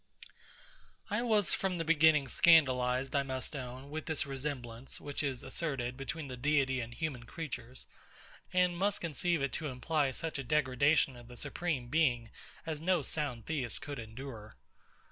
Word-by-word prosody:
I 210 Hz, +3 st, +1 dB
was 215 Hz, -5 st, +3 dB
from 190 Hz, -2 st, 0 dB
the 165 Hz, -, -2 dB
beginning 155 Hz, -3 st, +5 dB
scandalised, 130 Hz, -5 st, +4 dB
I 140 Hz, -, +4 dB
must 130 Hz, +1 st, -4 dB
own, 130 Hz, +1 st, -6 dB
with 155 Hz, 0 st, -4 dB
this 155 Hz, 0 st, 0 dB
resemblance, 135 Hz, -3 st, -5 dB
which 145 Hz, -1 st, -3 dB
is 135 Hz, -4 st, -2 dB
asserted, 130 Hz, -3 st, -2 dB
between 140 Hz, +3 st, -4 dB
the 130 Hz, -, -5 dB
Deity 135 Hz, 0 st, +2 dB
and 115 Hz, 0 st, -6 dB
human 125 Hz, -2 st, -4 dB
creatures; 130 Hz, -4 st, -6 dB, 0.7 s
and 180 Hz, -1 st, +3 dB
must 200 Hz, +3 st, +1 dB
conceive 170 Hz, -1 st, 0 dB
it 140 Hz, -, 0 dB
to 155 Hz, +6 st, -3 dB
imply 145 Hz, +2 st, 0 dB
such 160 Hz, +2 st, -3 dB
a -, -, -2 dB
degradation 140 Hz, 0 st, +3 dB
of 120 Hz, -1 st, -12 dB
the 125 Hz, 0 st, -11 dB
Supreme 145 Hz, -8 st, -2 dB
Being 125 Hz, -7 st, +2 dB, 0.3 s
as 155 Hz, -2 st, -3 dB
no 175 Hz, -2 st, +2 dB
sound 130 Hz, -7 st, -2 dB
Theist 140 Hz, -7 st, -2 dB
could 145 Hz, -2 st, -5 dB
endure. 110 Hz, -1 st, -8 dB
140 Hz, 160 wpm, -33 LUFS, 125-160 Hz, 0.7 s, beginning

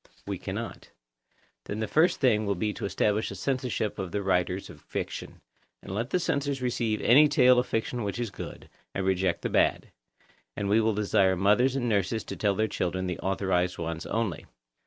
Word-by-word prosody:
We -, -, -4 dB
cannot. -, -, -6 dB, 0.8 s
Then 105 Hz, -, -4 dB
the 110 Hz, -, -1 dB
first 160 Hz, -, +3 dB
thing 110 Hz, -5 st, +3 dB
will 100 Hz, -, +1 dB
be 105 Hz, +3 st, -1 dB
to -, -, -5 dB
establish 105 Hz, +2 st, 0 dB
a 100 Hz, -, -6 dB
censorship 125 Hz, -1 st, -2 dB
of 95 Hz, -2 st, -4 dB
the 100 Hz, -1 st, -2 dB
writers 90 Hz, 0 st, 0 dB
of -, -, -13 dB
fiction, -, -, -6 dB, 0.4 s
and -, -, -7 dB
let 115 Hz, +6 st, -2 dB
the 180 Hz, -, +1 dB
censors 145 Hz, -5 st, -1 dB
receive 120 Hz, -3 st, -1 dB
any 145 Hz, +6 st, +7 dB
tale 125 Hz, -3 st, +5 dB
of 125 Hz, -, -1 dB
fiction 115 Hz, +2 st, -2 dB
which 100 Hz, +1 st, -3 dB
is 120 Hz, -4 st, -2 dB
good, -, -, -8 dB, 0.3 s
and 95 Hz, -, -1 dB
reject 95 Hz, -2 st, +1 dB
the -, -, 0 dB
bad; -, -, +1 dB, 0.7 s
and 100 Hz, -, -2 dB
we 110 Hz, +2 st, +4 dB
will 110 Hz, -1 st, +1 dB
desire 100 Hz, -2 st, +3 dB
mothers 105 Hz, +8 st, +3 dB
and 125 Hz, -3 st, -1 dB
nurses 105 Hz, 0 st, 0 dB
to -, -, -6 dB
tell 100 Hz, -2 st, +1 dB
their 110 Hz, +2 st, +1 dB
children 95 Hz, -2 st, -2 dB
the 90 Hz, -2 st, -3 dB
authorised 95 Hz, -2 st, 0 dB
ones 85 Hz, 0 st, -4 dB
only. 110 Hz, -6 st, -2 dB
105 Hz, 195 wpm, -28 LUFS, 95-120 Hz, 0.8 s, any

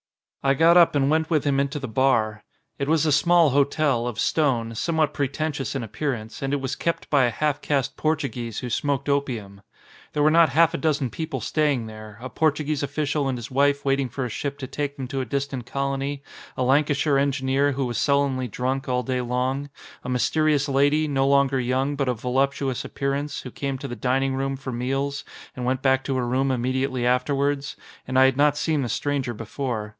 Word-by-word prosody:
I 135 Hz, 0 st, +3 dB
got 165 Hz, +4 st, +5 dB
up 170 Hz, -3 st, +6 dB
and 140 Hz, 0 st, +2 dB
went 160 Hz, 0 st, +1 dB
with 155 Hz, -4 st, +2 dB
him 140 Hz, -2 st, +1 dB
into 140 Hz, +2 st, -1 dB
the 135 Hz, -2 st, -4 dB
bar. 110 Hz, -3 st, +1 dB, 0.4 s
It 140 Hz, -, -1 dB
was 160 Hz, 0 st, +2 dB
a 155 Hz, -, +2 dB
small 165 Hz, +1 st, +4 dB
hotel, 140 Hz, -3 st, +2 dB
of 115 Hz, -3 st, -4 dB
stone, 120 Hz, -7 st, +1 dB
somewhat 155 Hz, +4 st, 0 dB
pretentious 145 Hz, 0 st, -2 dB
in 135 Hz, -, -2 dB
appearance, 110 Hz, 0 st, -4 dB
and 135 Hz, 0 st, -2 dB
it -, -, +2 dB
was 135 Hz, -1 st, -3 dB
kept 170 Hz, -, -2 dB
by 140 Hz, -4 st, +5 dB
a -, -, +2 dB
half 145 Hz, +4 st, -1 dB
caste 140 Hz, -3 st, -1 dB
Portuguese 130 Hz, -8 st, -2 dB
who 125 Hz, -, -4 dB
smoked 140 Hz, +3 st, -1 dB
opium. 120 Hz, -9 st, -2 dB, 0.5 s
There 150 Hz, -, +1 dB
were 155 Hz, -, +5 dB
not 165 Hz, -1 st, +5 dB
half 165 Hz, +4 st, +4 dB
a -, -, -2 dB
dozen 145 Hz, -6 st, 0 dB
people 160 Hz, +7 st, -4 dB
staying 145 Hz, -6 st, 0 dB
there, 110 Hz, -1 st, -10 dB
a 125 Hz, -, -6 dB
Portuguese 155 Hz, -2 st, 0 dB
official 145 Hz, 0 st, -1 dB
and 130 Hz, -2 st, -1 dB
his 120 Hz, +1 st, -8 dB
wife 140 Hz, +1 st, +2 dB
waiting 135 Hz, -1 st, +1 dB
for 130 Hz, +2 st, -3 dB
a -, -, -4 dB
ship 140 Hz, +5 st, -4 dB
to 140 Hz, -, -6 dB
take 145 Hz, +2 st, -4 dB
them 130 Hz, -2 st, -5 dB
to 135 Hz, -1 st, -2 dB
a -, -, -3 dB
distant 135 Hz, -1 st, -3 dB
colony, 140 Hz, +1 st, -2 dB, 0.3 s
a 130 Hz, -, 0 dB
Lancashire 140 Hz, +1 st, +2 dB
engineer 140 Hz, 0 st, +1 dB
who 135 Hz, 0 st, -1 dB
was 120 Hz, -2 st, -2 dB
sullenly 140 Hz, -3 st, +1 dB
drunk 130 Hz, +4 st, -2 dB
all 125 Hz, 0 st, 0 dB
day 125 Hz, +1 st, -1 dB
long, 130 Hz, +3 st, -2 dB, 0.3 s
a 125 Hz, -, -5 dB
mysterious 145 Hz, +4 st, +2 dB
lady, 145 Hz, +3 st, +2 dB
no 135 Hz, -2 st, +1 dB
longer 140 Hz, -1 st, +3 dB
young 130 Hz, +3 st, 0 dB
but 140 Hz, -2 st, -1 dB
of 120 Hz, -3 st, -2 dB
voluptuous 135 Hz, 0 st, 0 dB
appearance, 140 Hz, +1 st, -3 dB
who 125 Hz, -, -8 dB
came 135 Hz, +1 st, -3 dB
to 140 Hz, -, -6 dB
the 120 Hz, -, -5 dB
dining 130 Hz, +4 st, 0 dB
room 135 Hz, +1 st, -1 dB
for 130 Hz, -1 st, -6 dB
meals 135 Hz, +3 st, -2 dB, 0.3 s
and 125 Hz, -, -4 dB
went 130 Hz, +1 st, -1 dB
back 135 Hz, -1 st, +3 dB
to 135 Hz, -, -2 dB
her 125 Hz, -1 st, -1 dB
room 130 Hz, +2 st, +1 dB
immediately 130 Hz, 0 st, -1 dB
afterwards, 140 Hz, +3 st, 0 dB, 0.3 s
and 130 Hz, 0 st, -1 dB
I 130 Hz, -, +7 dB
had 130 Hz, 0 st, +2 dB
not 145 Hz, 0 st, +3 dB
seen 155 Hz, -1 st, 0 dB
the 125 Hz, -, -2 dB
stranger 135 Hz, -1 st, -1 dB
before. 115 Hz, -1 st, -4 dB
135 Hz, 205 wpm, -24 LUFS, 125-145 Hz, 0.5 s, I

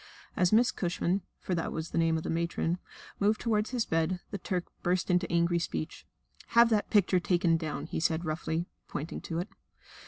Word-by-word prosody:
As 180 Hz, -1 st, +3 dB
Miss 230 Hz, +3 st, +5 dB
Cushman 180 Hz, +1 st, 0 dB, 0.2 s
for 185 Hz, -, -3 dB
that 165 Hz, -2 st, -1 dB
was 160 Hz, +1 st, -4 dB
the -, -, -2 dB
name 165 Hz, -1 st, +3 dB
of 160 Hz, -, -4 dB
the -, -, -4 dB
matron 170 Hz, +1 st, 0 dB, 0.4 s
moved 210 Hz, +2 st, +3 dB
toward 215 Hz, -2 st, +1 dB
his 245 Hz, -3 st, -1 dB
bed, 165 Hz, +3 st, 0 dB
the 200 Hz, -, -3 dB
Turk 180 Hz, 0 st, -2 dB, 0.2 s
burst 180 Hz, +1 st, +1 dB
into 180 Hz, -1 st, +2 dB
angry 170 Hz, 0 st, +3 dB
speech. 80 Hz, -, -4 dB, 0.5 s
"Have 235 Hz, 0 st, +8 dB
that 210 Hz, -2 st, +2 dB
picture 190 Hz, -3 st, +4 dB
taken 175 Hz, -1 st, +2 dB
down," 160 Hz, -2 st, -3 dB
he -, -, -3 dB
said 165 Hz, +1 st, +1 dB
roughly, 160 Hz, +1 st, -1 dB, 0.2 s
pointing 155 Hz, +3 st, -5 dB
to 165 Hz, -, -4 dB
it. 180 Hz, +5 st, -2 dB
175 Hz, 190 wpm, -30 LUFS, 165-190 Hz, 0.5 s, Have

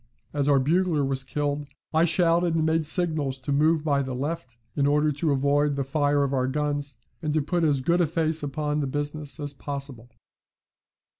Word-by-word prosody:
As 145 Hz, -1 st, +1 dB
our 140 Hz, -, +5 dB
bugler 155 Hz, +2 st, +2 dB
was 135 Hz, -1 st, -1 dB
killed, 145 Hz, 0 st, -2 dB, 0.3 s
I 160 Hz, +2 st, +4 dB
shouted 170 Hz, 0 st, +2 dB
and 160 Hz, -1 st, +1 dB
made 160 Hz, -1 st, +2 dB
signals 155 Hz, -6 st, +1 dB
to 130 Hz, +2 st, -5 dB
move 155 Hz, +2 st, +3 dB
by 140 Hz, -3 st, +1 dB
the 130 Hz, -2 st, -4 dB
left, 140 Hz, -3 st, -4 dB, 0.2 s
in 140 Hz, -1 st, +2 dB
order 150 Hz, +1 st, +3 dB
to 150 Hz, +2 st, 0 dB
avoid 140 Hz, +1 st, +2 dB
the 140 Hz, -, -1 dB
fire 145 Hz, +1 st, +1 dB
of 140 Hz, 0 st, -1 dB
our 130 Hz, -1 st, +1 dB
guns, 145 Hz, -1 st, -2 dB, 0.2 s
and 155 Hz, -2 st, -1 dB
to 155 Hz, -, +3 dB
put 175 Hz, +3 st, 0 dB
as 145 Hz, -4 st, +2 dB
good 170 Hz, +6 st, +2 dB
a 170 Hz, -, +3 dB
face 160 Hz, 0 st, 0 dB
upon 150 Hz, +1 st, -2 dB
the 140 Hz, -, -1 dB
business 145 Hz, +2 st, -4 dB
as 145 Hz, -1 st, -4 dB
possible. 140 Hz, -4 st, -7 dB
145 Hz, 195 wpm, -25 LUFS, 140-160 Hz, 0.3 s, our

